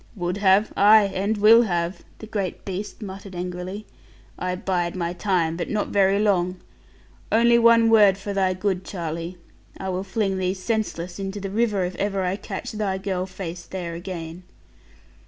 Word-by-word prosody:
'Would 180 Hz, -1 st, -2 dB
have? 200 Hz, +1 st, +3 dB
Ay, 205 Hz, 0 st, +6 dB
and 205 Hz, +3 st, 0 dB
will 220 Hz, +3 st, +7 dB
have,' 175 Hz, -4 st, -1 dB, 0.2 s
the -, -, -9 dB
great 205 Hz, -4 st, -4 dB
beast 200 Hz, +3 st, -5 dB
muttered 195 Hz, -1 st, -8 dB
angrily. 180 Hz, +3 st, -5 dB, 0.5 s
'I 180 Hz, 0 st, -1 dB
bide 180 Hz, -2 st, -1 dB
my 175 Hz, -1 st, -2 dB
time; 175 Hz, -3 st, 0 dB
but 175 Hz, -, -4 dB
not 210 Hz, -1 st, -1 dB
very 195 Hz, 0 st, +3 dB
long. 185 Hz, -3 st, +1 dB, 0.7 s
Only 235 Hz, +1 st, +5 dB
one 230 Hz, -1 st, +6 dB
word 210 Hz, -4 st, +6 dB
for 200 Hz, +1 st, -5 dB
thy 190 Hz, -2 st, +1 dB
good, 190 Hz, -1 st, -1 dB
Charlie. 170 Hz, -1 st, -5 dB, 0.4 s
I 190 Hz, -, -4 dB
will 185 Hz, 0 st, -2 dB
fling 195 Hz, -2 st, -1 dB
thee 185 Hz, 0 st, 0 dB
senseless 185 Hz, -4 st, -3 dB
into 195 Hz, +1 st, -4 dB
the 195 Hz, -1 st, -5 dB
river, 210 Hz, -3 st, +1 dB
if 180 Hz, -, -4 dB
ever 195 Hz, -1 st, -1 dB
I 180 Hz, +1 st, 0 dB
catch 195 Hz, -1 st, -6 dB
thy 205 Hz, -3 st, -2 dB
girl 190 Hz, -1 st, -3 dB
face 180 Hz, -2 st, -7 dB
there 175 Hz, -3 st, -5 dB
again.' 170 Hz, -1 st, -7 dB
190 Hz, 170 wpm, -24 LUFS, 180-205 Hz, 0.7 s, will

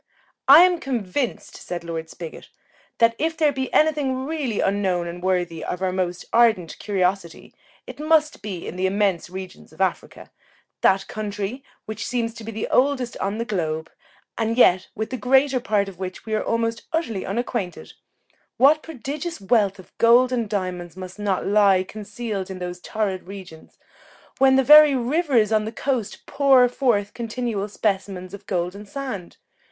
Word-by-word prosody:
"I 285 Hz, +5 st, +10 dB
am 360 Hz, -1 st, +3 dB
convinced," 245 Hz, -, -3 dB
said 175 Hz, -1 st, -6 dB
Lord 165 Hz, -1 st, -5 dB
Spigot, 165 Hz, -1 st, -9 dB, 0.5 s
"that 230 Hz, 0 st, +4 dB
if 320 Hz, +1 st, -1 dB
there 305 Hz, -2 st, +3 dB
be 265 Hz, -1 st, -4 dB
any 315 Hz, +1 st, +4 dB
thing 265 Hz, -3 st, -2 dB
really 280 Hz, -8 st, -2 dB
unknown 190 Hz, -3 st, 0 dB
and 170 Hz, +1 st, -7 dB
worthy 180 Hz, -3 st, -1 dB
of 180 Hz, -, -4 dB
our 185 Hz, -, +1 dB
most 180 Hz, -1 st, -2 dB
ardent 220 Hz, -8 st, +3 dB
curiosity, 190 Hz, -3 st, -2 dB, 0.3 s
it -, -, -10 dB
must 310 Hz, -3 st, +2 dB
be 195 Hz, -4 st, -6 dB
in 180 Hz, -, -6 dB
the 190 Hz, +1 st, +1 dB
immense 195 Hz, -3 st, 0 dB
regions 185 Hz, 0 st, -9 dB
of -, -, -19 dB
Africa; -, -, -2 dB, 0.5 s
that 195 Hz, 0 st, +3 dB
country, 210 Hz, +4 st, -5 dB, 0.2 s
which 220 Hz, +1 st, -5 dB
seems 230 Hz, -2 st, -1 dB
to 230 Hz, -1 st, -10 dB
be 225 Hz, -, -6 dB
the 220 Hz, 0 st, -4 dB
oldest 260 Hz, -2 st, +1 dB
on 200 Hz, +2 st, -2 dB
the 230 Hz, -, -2 dB
globe, 160 Hz, -7 st, -3 dB, 0.5 s
and 225 Hz, +1 st, 0 dB
yet 185 Hz, -6 st, +5 dB
with 220 Hz, +2 st, -4 dB
the 255 Hz, -, -3 dB
greater 265 Hz, +1 st, +3 dB
part 205 Hz, -3 st, 0 dB
of 190 Hz, -2 st, -10 dB
which 185 Hz, -1 st, -6 dB
we 220 Hz, -, -4 dB
are 215 Hz, -, 0 dB
almost 230 Hz, 0 st, -1 dB
utterly 310 Hz, -, -2 dB
unacquainted; 205 Hz, -3 st, -4 dB, 0.6 s
what 295 Hz, +4 st, +5 dB
prodigious 305 Hz, +3 st, -6 dB
wealth 200 Hz, -1 st, +2 dB
of 185 Hz, -, -16 dB
gold 245 Hz, +2 st, +5 dB
and 235 Hz, -4 st, -1 dB
diamonds 180 Hz, -4 st, -4 dB
must 185 Hz, +2 st, -9 dB
not 200 Hz, -2 st, -1 dB
lie 200 Hz, -2 st, +4 dB
concealed 205 Hz, -1 st, -6 dB
in 190 Hz, -, -6 dB
those 180 Hz, 0 st, -6 dB
torrid 195 Hz, -3 st, -3 dB
regions, 185 Hz, -5 st, -11 dB, 0.6 s
when 265 Hz, 0 st, +5 dB
the 270 Hz, -, +4 dB
very 300 Hz, +1 st, +8 dB
rivers 255 Hz, -, +1 dB
on 215 Hz, -1 st, +2 dB
the 220 Hz, -, -4 dB
coast 235 Hz, -3 st, -3 dB
pour 270 Hz, -3 st, +4 dB
forth 235 Hz, -5 st, 0 dB
continual 230 Hz, -3 st, -3 dB
specimens 195 Hz, -3 st, -2 dB
of 200 Hz, 0 st, -10 dB
golden 180 Hz, +2 st, -2 dB
sand! 210 Hz, -5 st, -6 dB
215 Hz, 170 wpm, -23 LUFS, 185-255 Hz, 0.6 s, I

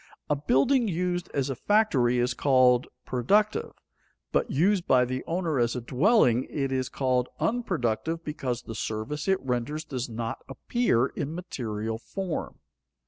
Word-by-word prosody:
A -, -, +4 dB
building 220 Hz, -, +2 dB
used 180 Hz, -1 st, -1 dB
as 140 Hz, -1 st, -1 dB
a -, -, -3 dB
factory 135 Hz, -, +2 dB
is 120 Hz, 0 st, +1 dB
called 130 Hz, -1 st, +4 dB, 0.2 s
productive, 200 Hz, -, +1 dB, 0.6 s
but -, -, +1 dB
used 180 Hz, +5 st, +2 dB
by 125 Hz, -1 st, +5 dB
the 130 Hz, +1 st, -3 dB
owner 165 Hz, -5 st, 0 dB
as 120 Hz, 0 st, +1 dB
a -, -, -1 dB
dwelling 130 Hz, -, +3 dB
it 135 Hz, -2 st, -2 dB
is 130 Hz, -1 st, -1 dB
called 130 Hz, -2 st, 0 dB
unproductive 165 Hz, -, -1 dB
because 130 Hz, -6 st, -3 dB
the 115 Hz, -, -7 dB
service 110 Hz, -, -4 dB
it 190 Hz, 0 st, +3 dB
renders 130 Hz, +5 st, -2 dB
does 130 Hz, -4 st, -4 dB
not 115 Hz, 0 st, -4 dB
appear 135 Hz, -, +1 dB
in 145 Hz, +3 st, -4 dB
material 110 Hz, -, -4 dB
form. 185 Hz, -, -5 dB
135 Hz, 145 wpm, -27 LUFS, 125-175 Hz, 0.6 s, by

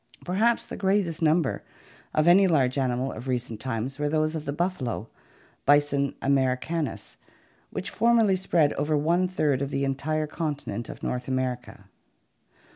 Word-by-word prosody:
Perhaps 220 Hz, +6 st, +1 dB
the -, -, -7 dB
greatest 190 Hz, -4 st, 0 dB
numbers 160 Hz, -2 st, +2 dB, 0.5 s
of 155 Hz, +1 st, +2 dB
any 190 Hz, +3 st, +7 dB
large 135 Hz, -7 st, +2 dB
animal 130 Hz, -1 st, 0 dB
of 120 Hz, +4 st, -8 dB
recent 125 Hz, -3 st, -2 dB
times 130 Hz, +2 st, -4 dB
were 145 Hz, 0 st, 0 dB
those 155 Hz, +1 st, +1 dB
of 160 Hz, -1 st, -5 dB
the 140 Hz, -, -2 dB
buffalo 145 Hz, -, -2 dB, 0.6 s
(Bison 145 Hz, -1 st, +3 dB
americanus) 135 Hz, -, -1 dB, 0.5 s
which 190 Hz, +2 st, -4 dB
formerly 225 Hz, -3 st, +3 dB
spread 170 Hz, -5 st, +2 dB
over 150 Hz, +2 st, 0 dB
one 170 Hz, +5 st, +2 dB
third 150 Hz, -7 st, 0 dB
of 140 Hz, -, -1 dB
the 140 Hz, 0 st, -1 dB
entire 155 Hz, +3 st, -1 dB
continent 145 Hz, -, -4 dB
of -, -, -9 dB
North 125 Hz, 0 st, -3 dB
America. 130 Hz, -2 st, -3 dB
145 Hz, 145 wpm, -26 LUFS, 130-170 Hz, 0.6 s, any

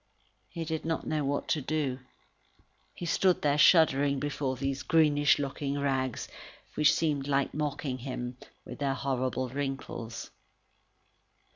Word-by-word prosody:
He 165 Hz, -2 st, -5 dB
did 160 Hz, 0 st, -3 dB
not 165 Hz, 0 st, -2 dB
know 155 Hz, -1 st, -1 dB
what 140 Hz, +1 st, -1 dB
to 155 Hz, -, +1 dB
do. 140 Hz, -2 st, -1 dB, 1.0 s
He 175 Hz, -, -6 dB
stood 180 Hz, +2 st, +2 dB
there 145 Hz, 0 st, +2 dB
shuddering 145 Hz, -5 st, +5 dB
before 140 Hz, -2 st, -2 dB
those 135 Hz, +1 st, -2 dB
greenish 145 Hz, -1 st, +4 dB
looking 140 Hz, 0 st, -3 dB
rags, 130 Hz, -3 st, -1 dB, 0.5 s
which 150 Hz, -1 st, +5 dB
seemed 145 Hz, -4 st, 0 dB
like 140 Hz, -1 st, +1 dB
mocking 145 Hz, -3 st, -2 dB
him, 125 Hz, -1 st, -5 dB, 0.3 s
with -, -, -9 dB
their 140 Hz, -2 st, 0 dB
horrible 130 Hz, -1 st, -1 dB
wrinkles. 135 Hz, -4 st, -5 dB
140 Hz, 130 wpm, -29 LUFS, 135-150 Hz, 1.0 s, shuddering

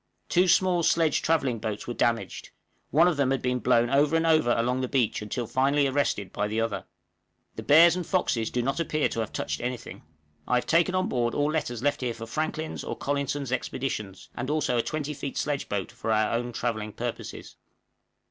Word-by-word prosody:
Two 185 Hz, 0 st, +3 dB
small 180 Hz, 0 st, +3 dB
sledge 165 Hz, -1 st, +2 dB
travelling 140 Hz, -8 st, +1 dB
boats 105 Hz, -1 st, -4 dB
were 120 Hz, -, -4 dB
damaged; 115 Hz, -1 st, -1 dB, 0.4 s
one 165 Hz, +4 st, +5 dB
of 175 Hz, -4 st, +1 dB
them 140 Hz, -2 st, +2 dB
had 135 Hz, 0 st, +1 dB
been 125 Hz, 0 st, 0 dB
blown 120 Hz, -1 st, +3 dB
over 145 Hz, +3 st, +3 dB
and 165 Hz, 0 st, +2 dB
over 155 Hz, -7 st, +3 dB
along 125 Hz, +2 st, 0 dB
the 130 Hz, -, -1 dB
beach 125 Hz, -6 st, 0 dB
until 110 Hz, +3 st, -3 dB
finally 135 Hz, +5 st, +2 dB
arrested 130 Hz, -8 st, -1 dB
by 105 Hz, -, -1 dB
the 110 Hz, +2 st, -2 dB
other. 105 Hz, -4 st, -2 dB, 0.7 s
The -, -, -5 dB
bears 165 Hz, +3 st, +6 dB
and 180 Hz, -, -2 dB
foxes 125 Hz, -, 0 dB
do 125 Hz, -, -1 dB
not 135 Hz, +3 st, -1 dB
appear 155 Hz, -2 st, 0 dB
to -, -, -4 dB
have 110 Hz, -, -2 dB
touched -, -, -3 dB
any 125 Hz, +1 st, -2 dB
thing. 120 Hz, -, -11 dB, 0.5 s
I 125 Hz, -, +2 dB
have 125 Hz, -, +1 dB
taken 170 Hz, +3 st, +2 dB
on 185 Hz, -, +1 dB
board 120 Hz, -2 st, -1 dB
all 145 Hz, +1 st, +1 dB
letters 120 Hz, -7 st, -2 dB
left 145 Hz, -1 st, +1 dB
here 120 Hz, -2 st, -2 dB
for 115 Hz, -, -7 dB
Franklin's 155 Hz, +5 st, -3 dB
or -, -, -5 dB
Collinson's 140 Hz, -1 st, -2 dB
expeditions 120 Hz, -6 st, -4 dB
and 130 Hz, +3 st, -4 dB
also 150 Hz, -5 st, 0 dB
a 120 Hz, -, +3 dB
20 150 Hz, +3 st, -3 dB
feet 140 Hz, -1 st, -6 dB
sledge 145 Hz, -1 st, -2 dB
boat 100 Hz, +1 st, -3 dB
for 115 Hz, -1 st, -4 dB
our 110 Hz, 0 st, +2 dB
own 120 Hz, +1 st, -1 dB
travelling 110 Hz, -3 st, -3 dB
purposes. -, -, -6 dB
130 Hz, 205 wpm, -27 LUFS, 115-150 Hz, 0.7 s, bears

